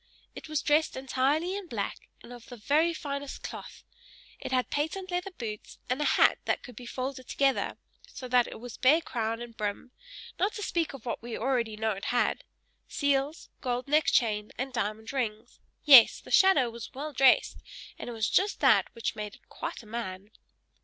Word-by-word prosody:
It - - -10
was 310 -1 -1
dressed 305 +1 +2
entirely 275 +7 0
in 400 -2 -6
black, 210 -9 -5
and 245 - -11
of 240 -1 -12
the 245 - -9
very 300 +10 +2
finest 280 -3 -5
cloth; - - -8 0.6
it - - -6
had 255 -1 0
patent 360 +6 -2
leather 360 +2 -2
boots, 225 - -7
and 260 +4 0
a - - +1
hat - - +4
that - - 0
could 250 - -11
be 245 +2 -9
folded 255 +1 -5
together, 275 -1 +1 0.3
so 275 - -8
that 245 -1 +3
it - - -9
was 245 -1 -9
bare 275 +6 +5
crown 230 -5 -3
and 235 -1 -11
brim; 210 +4 -4 0.5
not 395 +4 +1
to 420 - -5
speak 335 -5 -1
of 265 -4 -11
what 235 - -3
we 235 0 -5
already 235 -3 -1
know 220 0 0
it 195 -1 -5
had 245 0 +1 0.4
seals, 285 +2 -1
gold 250 0 -2
neck 300 +1 +3
chain, 210 -3 +2
and 265 +1 -4
diamond 220 +1 -3
rings; 220 -5 -3 0.3
yes, 270 -6 +9
the - - -13
shadow 300 -11 +5
was 230 -1 -8
well 295 +3 -5
dressed, 265 0 +4 0.4
and - - -6
it - - -5
was 220 -1 0
just 400 +2 +1
that - - +5
which 230 - -3
made 210 -1 -6
it - - -25
quite - - -6
a - - -16
man. 210 -3 -6
255 Hz, 195 wpm, -29 LUFS, 230-295 Hz, 0.6 s, yes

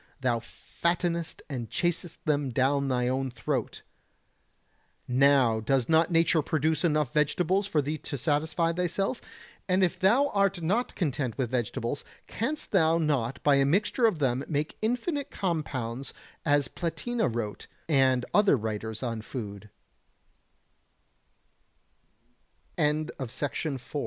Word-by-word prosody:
thou 120 -3 +1
fattenest 170 +7 -2
and 125 -6 -5
chasest 175 -1 -1
them 145 -3 +1
down 135 +3 +1
thy 125 -2 +1
own 130 +1 0
throat. 125 - -3 1.2
Now 130 -3 +4
does 125 +2 +1
not 160 +1 +4
nature 165 -1 +3
produce 155 +2 0
enough 150 -6 +1
vegetables 180 +6 +1
for 155 -6 +1
thee 150 +2 -3
to 140 - -5
satisfy 160 +4 +1
thyself? 180 +7 -1 0.5
And 185 +1 +3
if 185 0 +1
thou 240 +10 +4
art 195 -2 +2
not 210 +10 0
content 135 - -1
with 125 -3 -1
vegetables, 125 +2 -2 0.2
canst 275 +9 -3
thou 165 -4 +4
not 135 -6 0
by 145 -1 +5
a 140 - +4
mixture 205 - +3
of 215 - 0
them 135 -2 0
make 150 0 -2
infinite 250 +6 -1
compounds 135 - -3 0.3
as 145 -2 +3
P 175 - -3
155 Hz, 105 wpm, -28 LUFS, 135-180 Hz, 1.2 s, by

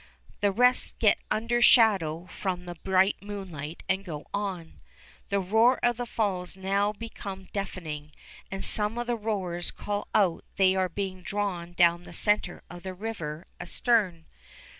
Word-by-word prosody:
The 205 -1 +3
rest 250 +5 +3
get 215 -3 +4
under 230 +3 +1
shadow 190 -10 +5
from 180 -2 -3
the 175 - -5
bright 190 +3 +2
moonlight 180 -7 -7
and 190 +1 0
go 155 -6 -7
on. 185 - -4 0.5
The 200 - +1
roar 220 +7 +4
of 240 -1 +3
the 245 0 -3
Falls 195 -5 -1
now 200 +2 +1
became 200 -3 -8
deafening, 160 -7 -5 0.4
and 195 0 -3
some 210 +2 +4
of 240 - -1
the 240 0 0
rowers 190 -6 -2
called 205 0 -4
out 185 -5 +3
they 190 -1 +4
were 185 -1 +1
being 185 0 -4
drawn 180 -3 -3
down 175 0 +3
the - - -11
center 210 -4 +1
of 175 0 -10
the 185 0 -6
river 180 -6 -5
astern. 185 -5 +1
195 Hz, 155 wpm, -28 LUFS, 175-210 Hz, 0.5 s, shadow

